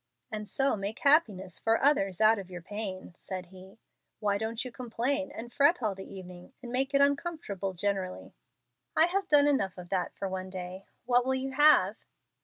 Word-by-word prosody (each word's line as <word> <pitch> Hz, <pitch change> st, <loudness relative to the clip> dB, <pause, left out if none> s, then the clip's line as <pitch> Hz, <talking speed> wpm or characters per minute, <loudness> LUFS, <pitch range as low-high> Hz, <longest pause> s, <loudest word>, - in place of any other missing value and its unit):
"And 210 Hz, -1 st, -5 dB
so 275 Hz, -2 st, +2 dB
make 205 Hz, +3 st, -4 dB
happiness 210 Hz, -, +3 dB
for 225 Hz, 0 st, +2 dB
others 195 Hz, -10 st, +2 dB
out 220 Hz, 0 st, +5 dB
of 190 Hz, -2 st, -9 dB
your 175 Hz, -2 st, -8 dB
pain," 195 Hz, -2 st, -6 dB
said 185 Hz, -1 st, -6 dB
he. 190 Hz, +2 st, -15 dB, 0.4 s
"Why 205 Hz, -2 st, 0 dB
don't 225 Hz, +2 st, -3 dB
you 255 Hz, -, -6 dB
complain 255 Hz, +4 st, -2 dB
and 240 Hz, +1 st, -8 dB
fret 290 Hz, 0 st, +3 dB
all 215 Hz, -2 st, +1 dB
the 190 Hz, 0 st, -10 dB
evening 185 Hz, +3 st, -11 dB
and 240 Hz, -, -7 dB
make 265 Hz, +2 st, +1 dB
it 280 Hz, -, +5 dB
uncomfortable 280 Hz, -, -1 dB
generally?" 190 Hz, 0 st, -3 dB, 0.6 s
"I 320 Hz, -, +6 dB
have 380 Hz, +2 st, -1 dB
done 290 Hz, -3 st, +6 dB
enough 235 Hz, -11 st, +1 dB
of 180 Hz, -1 st, -9 dB
that 185 Hz, -2 st, -2 dB
for 195 Hz, -, -3 dB
one 185 Hz, 0 st, -5 dB
day. 185 Hz, +1 st, -7 dB, 0.2 s
What 245 Hz, 0 st, +3 dB
will 265 Hz, +1 st, 0 dB
you 265 Hz, +1 st, -3 dB
have?" 295 Hz, +3 st, +5 dB
215 Hz, 190 wpm, -29 LUFS, 190-270 Hz, 0.6 s, I